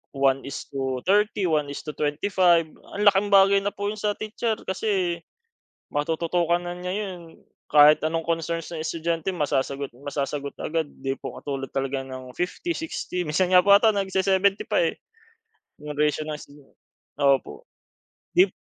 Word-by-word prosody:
1 135 0 +2
is 140 - -5
to 130 -2 -3
30, 205 0 +2
1 155 -3 +1
is 140 - -6
to 155 - -5
25. 170 +4 +2 0.3
Ang 205 - -1
laking 200 0 +5
bagay 195 0 +6
na 200 +1 -3
po 205 0 -2
'yon 215 - -7
sa 205 0 0
titser 220 +1 -2
kasi 190 -3 -1 0.7
matututukan 170 +3 0
na 175 0 -6
niya 180 0 -5
'yon. 185 -5 -6 0.3
Kahit 150 +1 +7
anong 165 +1 -1
concerns 165 0 -2
ng 160 -2 -4
estudyante 165 +2 -2
masasagot 140 -4 -1
at 125 - -19
masasagot 140 0 -3
agad 165 0 -1
'di 135 0 -2
po - - -7
katulad 135 -2 -5
talaga 135 0 -2
ng 130 -1 -9
50, 335 - -2
60. 180 - -3
Minsan 175 +4 0
nga 180 - +8
po 200 - +4
'ata 210 +2 +6
nag-se-seventy 195 0 +1
pa, - - +2
eh. - - -1 0.8
'Yong 150 -1 -6
ratio 150 0 +2
ng 150 - -3
estudya 145 -1 -15 0.5
opo. 140 - +1 0.7
Dib 370 +2 +5
170 Hz, 160 wpm, -25 LUFS, 145-195 Hz, 0.8 s, nga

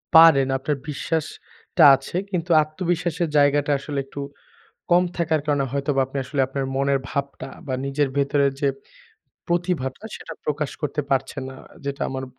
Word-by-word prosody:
পারেন, 160 -5 +8
আপনার 140 +2 -2
বিশ্বাসটা 160 +3 -2
আছে। 135 - -9 0.2
কিন্তু 175 -2 -2
আত্মবিশ্বাসের 170 +1 -2
জায়গাটা 145 0 +3
আসলে 140 0 -4
একটু 140 +1 -7 0.7
কম 175 +1 +6
থাকার 160 -2 +1
কারণে 145 -2 +2
হয়তোবা 140 0 0
আপনি 135 - -8
আসলে 140 +2 -2
আপনার 135 +1 -3
মনের 140 0 +2
ভাবটা 140 -1 -4 0.2
বা 130 - -2
নিজের 140 +1 0
ভেতরের 140 0 +2
যে 140 - +2 0.8
প্রতিভাটা 170 -5 -1
সেটা 165 - -8
প্রকাশ 150 -1 -1
করতে 150 0 -1
পারছেন 135 +1 -1
না, 130 - -10 0.3
যেটা 140 0 -4
আমার 130 0 -4
145 Hz, 145 wpm, -23 LUFS, 140-160 Hz, 0.8 s, পারেন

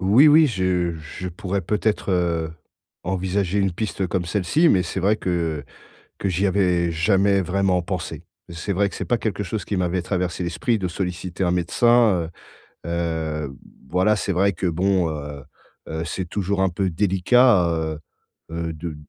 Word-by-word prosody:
Oui, 105 +10 +6
oui, 155 +1 +7
je 90 -5 0 0.2
je 90 - -3
pourrais 95 +2 -3
peut-être, 105 +2 -1
heu, 85 -3 0 0.5
envisager 95 +1 -1
une 95 - +2
piste 95 0 -3
comme 90 0 -1
celle-ci, 105 - +2
mais 95 -10 +4
c'est 90 +2 -4
vrai 100 +3 +3
que 85 -7 -2 0.5
que 100 - -1
j'y 95 +3 +1
avais 90 -3 +2
jamais 100 +3 +3
vraiment 95 0 +1
pensé. 90 -1 -5 0.3
C'est 85 +4 -4
vrai 100 +1 +2
que - - -7
c'est - - -3
pas 120 - +1
quelque 110 -2 -2
chose 100 +1 -4
qui 105 - -2
m'avait 90 0 0
traversé 90 -1 -2
l'esprit, 110 +8 0
de 95 - -1
solliciter 90 0 -3
un 90 - +2
médecin, 95 0 +3 0.6
heu - - -5 0.6
heu, 70 -1 -8 0.3
voilà. 95 +6 +3
C'est 100 - -2
vrai 100 +2 +2
que 90 +2 -2
bon, 90 +1 +1
heu 75 -2 -6 0.5
heu, 80 +1 -3
c'est 90 +2 -3
toujours 100 0 -1
un 95 - +3
peu 95 +1 -1
délicat, 95 +3 +4
heu 80 -2 -2 0.5
heu, 85 0 -3
de 80 0 -6
95 Hz, 170 wpm, -23 LUFS, 85-100 Hz, 0.6 s, oui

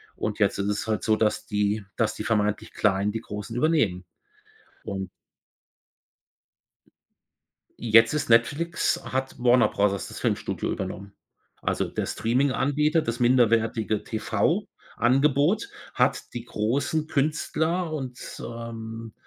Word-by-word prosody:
Und 105 0 -3
jetzt 100 - +2
ist 100 - 0
es 105 +1 -2
halt 110 -1 -1
so, 110 - +3
dass 110 -1 0
die 105 0 0
dass 115 - +1
die - - -5
vermeintlich 105 -2 0
Kleinen 100 0 +1
die 115 +1 -4
Großen 105 +3 -7
übernehmen. 120 - +1 0.8
Und 95 -3 -4 2.7
Jetzt 115 +2 +5
ist 145 -3 -1
Netflix 145 +9 +2
hat 130 0 -3
Warner 125 0 +5
Bros. 100 0 +1 0.2
das - - -8
Filmstudio - - -1
übernommen. 100 0 -5 0.5
Also, - - 0
der - - -3
Streaminganbieter, 140 +6 +1
das 115 -3 -3
minderwertige 115 -3 +2
TV 110 -1 0 0.3
Angebot 145 - +2 0.3
hat - - +1
die 120 -1 -5
großen 140 +8 -1
Künstler 160 +3 0
und, 130 -4 -6
ähm, 115 -1 -7
115 Hz, 120 wpm, -26 LUFS, 105-140 Hz, 2.7 s, Jetzt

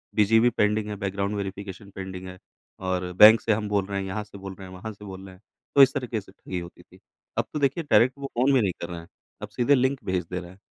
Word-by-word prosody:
BGP 115 +3 +5
pending 105 -1 +1
है 105 - -4
background 100 +1 -1
verification 100 0 -6
pending 95 -1 -7
है 90 0 -9 0.5
और 90 -1 -1
बैंक 110 +4 +8
से 115 - 0
हम 105 0 -2
बोल 100 -2 +1
रहे 100 0 -3
हैं 95 - -3
यहाँ 100 +3 -3
से 100 -1 -13
बोल 95 0 -7
रहे 95 0 -10
हैं 95 - -11
वहाँ 110 +4 -6
से 105 +1 -13
बोल 95 -1 -9
रहे 95 -1 -12
हैं 90 - -23 0.3
तो 140 - +8
इस 135 - +4
तरीके 125 -3 -2
से 95 - -18
ठगी 95 -2 -6
होती 85 0 -10
थी। - - -20 0.4
अब - - +1
तो 150 - -2
देखिए 140 +4 +1
डायरेक्ट 120 +4 +4
वो 140 - -4
फ़ोन 130 +3 +4
भी 130 - +4
नहीं 100 -4 +1
कर 85 - -4
रहे 85 -1 -6
हैं 85 - -13 0.3
अब - - -6
सीधे 130 +4 +3
लिंक 130 +1 +1
भेज 95 -2 -1
दे 90 - -2
रहे 85 -1 -10
है। 95 - -17
100 Hz, 275 wpm, -25 LUFS, 95-110 Hz, 0.5 s, बैंक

